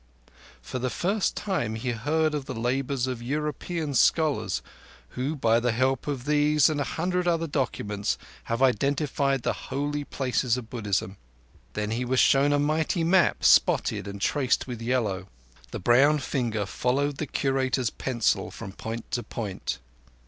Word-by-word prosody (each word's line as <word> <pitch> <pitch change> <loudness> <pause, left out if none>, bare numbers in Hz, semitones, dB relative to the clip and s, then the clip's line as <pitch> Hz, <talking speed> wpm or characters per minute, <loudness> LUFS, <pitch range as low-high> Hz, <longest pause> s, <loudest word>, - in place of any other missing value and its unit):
For 130 - -4
the 130 +1 -1
first 195 - 0
time 145 - -2
he 120 +3 -2
heard 150 +7 0
of 145 -3 -2
the 130 - -5
labours 125 +2 -1
of 125 -2 -4
European 150 +3 -3
scholars, 150 +3 +2 0.5
who 135 +5 -3
by 115 -4 +3
the 120 -1 0
help 130 +3 0
of 135 -4 -3
these 150 +1 +4
and 145 -2 -1
a - - +2
hundred 180 +5 -1
other 165 -1 +2
documents 105 -8 -2 0.3
have 115 +3 0
identified 140 0 +1
the - - +1 0.2
Holy 145 +2 -2
Places 125 -3 0
of 115 -3 -8
Buddhism. 100 -4 -2 0.6
Then 105 0 -2
he 120 +3 -1
was 125 +1 +1
shown 140 +1 +5
a 145 - +3
mighty 155 +4 +1
map, 175 +2 +3
spotted - - +4
and 100 0 -6
traced 130 +5 +1
with 120 -3 -6
yellow. 110 -6 -1 0.4
The - - -5
brown 135 +9 +4
finger 120 -7 -1
followed 135 +7 0
the 150 - -3
Curator's 130 -3 0
pencil 120 -4 0
from 95 - -8
point 115 +3 -6
to 120 - 0
point. 105 -5 -4
130 Hz, 155 wpm, -26 LUFS, 120-145 Hz, 0.6 s, shown